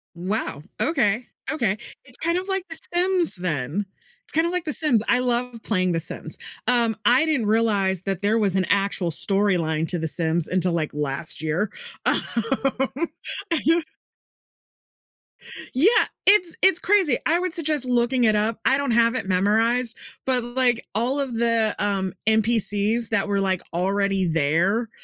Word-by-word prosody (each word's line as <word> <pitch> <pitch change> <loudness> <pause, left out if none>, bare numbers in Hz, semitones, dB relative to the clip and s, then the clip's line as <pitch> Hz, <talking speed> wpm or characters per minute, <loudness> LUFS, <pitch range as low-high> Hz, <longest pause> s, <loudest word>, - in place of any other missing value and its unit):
Wow, 180 -4 -4 0.2
okay, 240 -6 0 0.2
okay. 235 -10 -1 0.3
It's 255 -2 +1
kind 335 +2 -1
of, 375 +2 -4
like, 385 -1 -2
The 325 - +1
Sims 360 -1 +3
then, 175 +1 -3 0.4
it's - - -5
kinda 325 +2 +1
like 360 -1 -3
The 305 - 0
Sims, 275 -9 +3
I - - +3
love 245 -1 -2
playing 185 -4 0
The 165 - 0
Sims. - - -1 0.3
Um, 235 -3 +2
I 250 +5 +4
didn't 295 -8 0
realize 205 -4 +1
that 195 -1 -4
there 210 +2 +1
was 200 -4 +1
an 190 -1 +1
actual 200 -3 0
storyline 170 -3 +2
to 175 - -1
The 160 - -2
Sims 165 +1 +1
until, 180 -1 0
like, 160 -3 -2
last 145 +2 -3
year. 165 +7 -2 0.3
Um, - - +3 1.4
you 330 +1 +2 1.9
Yeah, 295 +11 +4 0.4
it's 375 -4 +4
it's 380 -2 +5
crazy, 370 -10 +2
I 335 +2 +2
would 365 -2 -3
suggest 305 -5 +1
looking 245 0 +1
it 215 -1 +3
up. 215 +2 -1
I 265 - +3
don't 280 -3 -2
have 230 +1 +3
it 255 - -4
memorized, 225 +6 +1 0.3
but, 255 -2 0
like, 240 -1 0
all 245 +6 0
of 270 -3 -3
the, 230 -2 +1
um, 195 -2 -1
NPCs 220 0 +3
that 215 -3 0
were, 200 -1 0
like, 190 -2 0
already 195 +1 0
there, 165 +9 0
220 Hz, 160 wpm, -23 LUFS, 190-255 Hz, 1.9 s, it's